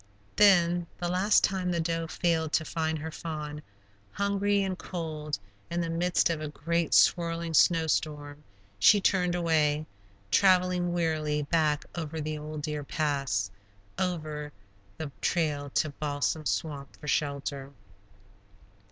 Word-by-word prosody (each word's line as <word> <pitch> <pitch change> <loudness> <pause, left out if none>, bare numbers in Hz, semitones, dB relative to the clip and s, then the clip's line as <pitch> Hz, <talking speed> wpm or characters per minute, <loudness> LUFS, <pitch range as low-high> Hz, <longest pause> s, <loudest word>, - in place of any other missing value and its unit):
Then, 175 -4 +5
the 175 - -2
last 185 +4 +3
time 185 -2 0
the 175 -1 0
doe 165 0 -1
failed 160 -2 0
to 155 - +2
find 160 -1 -1
her 160 +1 -6
fawn, 150 -2 -6 0.5
hungry 200 0 +1
and 190 -1 -2
cold, 155 -5 -4 0.3
in 170 - -2
the 165 -1 -1
midst 175 +1 +2
of 160 -2 -3
a 155 - -3
great 165 +2 -1
swirling 170 -1 +3
snow 165 0 +5
storm, 150 -1 -2 0.4
she 205 - +7
turned 180 -3 +2
away, 155 -3 +1 0.5
traveling 180 -2 +3
wearily 155 -3 0
back 150 -1 +1
over 160 -1 -4
the 155 0 -3
old 150 0 -6
Deer 150 -1 -3
Pass, 140 -10 -1 0.5
over 155 -5 -3 0.5
the 155 -3 -5
trail 150 -4 0
to 155 - +1
Balsam 145 +1 -2
Swamp 145 -3 -3
for 150 - -10
shelter. 140 -1 -2
160 Hz, 135 wpm, -28 LUFS, 150-175 Hz, 0.5 s, she